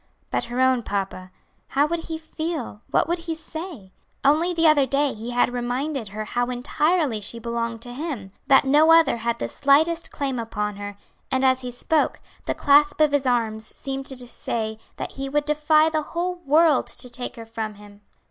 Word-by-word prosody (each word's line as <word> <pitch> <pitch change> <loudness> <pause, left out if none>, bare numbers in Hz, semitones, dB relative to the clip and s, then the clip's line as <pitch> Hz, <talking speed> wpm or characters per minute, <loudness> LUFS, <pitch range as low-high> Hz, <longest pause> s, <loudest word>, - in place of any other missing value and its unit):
But - - 0
her 240 +1 -4
own 260 -1 +4
papa, 195 -3 -4 0.4
how 280 +2 +2
would 330 +1 -3
he 320 - -4
feel 315 -8 -5
what - - +2
would 345 +1 0
he 335 -1 -4
say? 315 - -8 0.3
Only 315 +5 +3
the 335 -1 +1
other 295 -4 +5
day 280 +2 +1
he 225 +2 -7
had 245 0 +1
reminded 250 +1 -2
her 215 +2 -5
how 245 +2 -1
entirely 285 0 0
she 215 +3 -3
belonged 230 0 -3
to 245 - -8
him 255 - -5 0.2
that 270 0 +6
no 300 +4 +5
other 325 -7 +5
had 235 0 -1
the - - -3
slightest 320 +4 +2
claim 270 -3 -3
upon 210 -3 -3
her, 205 0 -7 0.3
and 260 0 0
as 260 0 +4
he 250 - -5
spoke, 295 +6 0 0.3
the - - -1
clasp 290 +1 +4
of 305 -2 +4
his 285 -2 +1
arms 225 -3 -1
seemed 270 0 -4
to 250 -2 -3
say 220 -2 -3 0.2
that - - -5
he 270 0 -5
would 295 +1 0
defy 305 +1 +4
the 315 -1 0
whole 345 +4 -2
world 305 -1 +4
to - - -3
take 245 +1 -5
her 230 -2 -9
from 225 -1 -5
him. 205 0 -15
265 Hz, 195 wpm, -24 LUFS, 230-305 Hz, 0.4 s, that